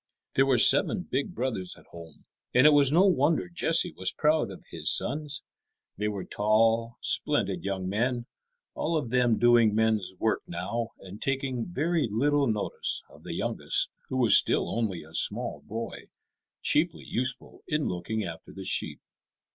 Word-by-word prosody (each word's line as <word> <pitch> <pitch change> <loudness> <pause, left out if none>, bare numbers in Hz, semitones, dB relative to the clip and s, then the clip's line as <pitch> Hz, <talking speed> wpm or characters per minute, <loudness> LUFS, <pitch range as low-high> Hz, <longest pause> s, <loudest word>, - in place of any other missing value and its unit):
There 135 +1 +3
were 130 -2 +3
seven 145 - +6
big 140 +6 -3
brothers 110 -9 -3
at - - -18
home, 80 -3 -13 0.3
and 130 +3 +6
it 150 - +8
was 145 -2 +4
no 175 +5 +5
wonder 165 -3 +2
Jesse 170 -1 0
was 95 0 -1
proud 155 -5 +1
of 95 - -11
his - - -1
sons. 145 0 -2 0.5
They 105 - -2
were 100 -3 -4
tall, 115 +3 +1
splendid - - +1
young 95 -1 -3
men, 120 +5 -1 0.5
all 165 +1 -1
of 120 -7 -4
them 125 -3 +2
doing 120 -3 +4
men's 110 -4 +1
work 110 - 0
now, 105 +7 -4
and 95 +2 -11
taking 135 -3 -2
very 165 -3 0
little 140 +5 +2
notice 110 -3 -2
of - - -17
the - - -6
youngest, - - -2 0.2
who 130 - -2
was 120 -5 +5
still - - +2
only 100 -8 -2
a 80 +1 -17
small 80 - +1
boy, 115 +2 -6 0.6
chiefly 160 +2 +1
useful 125 +1 -1
in 150 -1 -1
looking 100 +5 -3
after 80 -3 -8
the 95 - -9
sheep. - - -1
120 Hz, 165 wpm, -27 LUFS, 105-145 Hz, 0.6 s, it